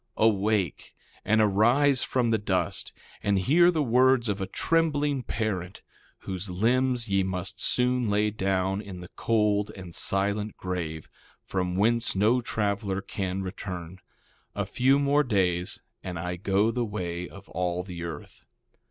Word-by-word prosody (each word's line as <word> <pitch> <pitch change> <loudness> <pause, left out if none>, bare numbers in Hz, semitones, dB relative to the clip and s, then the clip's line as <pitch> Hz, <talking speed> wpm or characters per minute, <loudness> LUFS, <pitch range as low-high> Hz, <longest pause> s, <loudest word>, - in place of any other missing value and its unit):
1:14 - - +4
Awake! 105 -5 0 0.3
and 110 +1 +3
arise 120 +7 +4
from 120 -3 +1
the 110 - +2
dust, 95 -1 -1 0.3
and 100 -1 +1
hear 160 - +5
the 160 -4 +1
words 125 -1 +4
of 100 -1 -2
a 95 - -2
trembling 145 - +1
parent, 100 -6 -3 0.4
whose 95 +1 -5
limbs 120 +5 +1
ye 100 -1 +2
must 95 0 -4
soon 125 -2 +1
lay 105 +1 +2
down 95 -1 0
in 95 -4 -9
the 90 - -10
cold 105 -2 +1
and 90 -3 -9
silent 100 +3 -1
grave, 85 -4 -4 0.4
from 90 -1 -2
whence 115 +4 +2
no 110 +6 +3
traveler 100 -4 -1
can 95 -1 -3
return; 95 -2 -6 0.6
a - - -1
few 135 +2 +3
more 145 +1 +3
days 90 -7 0 0.2
and 90 -2 -5
I 90 +2 -3
go 100 +4 +1
the 120 0 -1
way 90 -5 -4
of 100 0 -13
all 90 0 -2
the 90 -2 -8
earth. 80 -3 -8
100 Hz, 150 wpm, -27 LUFS, 95-115 Hz, 0.6 s, hear